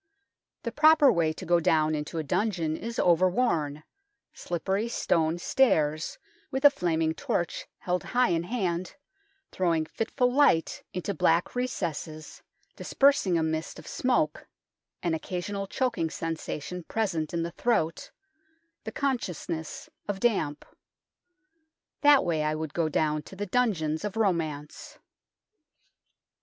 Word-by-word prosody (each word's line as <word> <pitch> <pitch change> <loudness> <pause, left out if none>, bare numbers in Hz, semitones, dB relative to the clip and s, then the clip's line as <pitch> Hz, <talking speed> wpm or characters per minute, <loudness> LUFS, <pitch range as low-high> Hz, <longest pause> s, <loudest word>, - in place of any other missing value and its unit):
The 235 - -3
proper 300 0 +6
way 165 -5 +2
to 185 - -9
go 175 0 +4
down 155 -1 +2
into 150 +2 -4
a 160 - -1
dungeon 165 -1 0
is 230 +6 -6
over 180 +1 +4
worn, 155 - 0 0.5
slippery 190 +5 -2
stone 165 -7 +1
stairs, 160 - +1 0.3
with 265 +2 -2
a 290 - +10
flaming 160 - 0
torch 170 +1 -2
held 180 0 -2
high 250 -4 +2
in 170 -1 +1
hand, 180 -3 -2 0.6
throwing 165 -4 +1
fitful 245 - 0
light 270 - +3
into 185 +3 -3
black 165 0 +2
recesses, 165 - -4 0.3
dispersing 270 -11 +3
a 160 - +1
mist 160 0 -2
of - - -11
smoke 245 -12 0 0.6
an 170 - +1
occasional 190 +4 -3
choking 235 -9 -1
sensation 165 +2 -4
present 170 -5 -2
in 170 -1 -1
the 170 - -4
throat, 165 -9 0 0.8
the - - -4
consciousness 180 - -3 0.2
of 200 -2 -3
damp. 190 -11 0 1.4
That 290 -2 +6
way 165 -3 0
I 155 0 0
would 155 -1 -5
go 165 -2 0
down 155 0 0
to 170 - -13
the 205 +2 -3
dungeons 180 -8 0
of 210 +1 -4
romance. 170 - -2
175 Hz, 130 wpm, -28 LUFS, 160-225 Hz, 1.4 s, a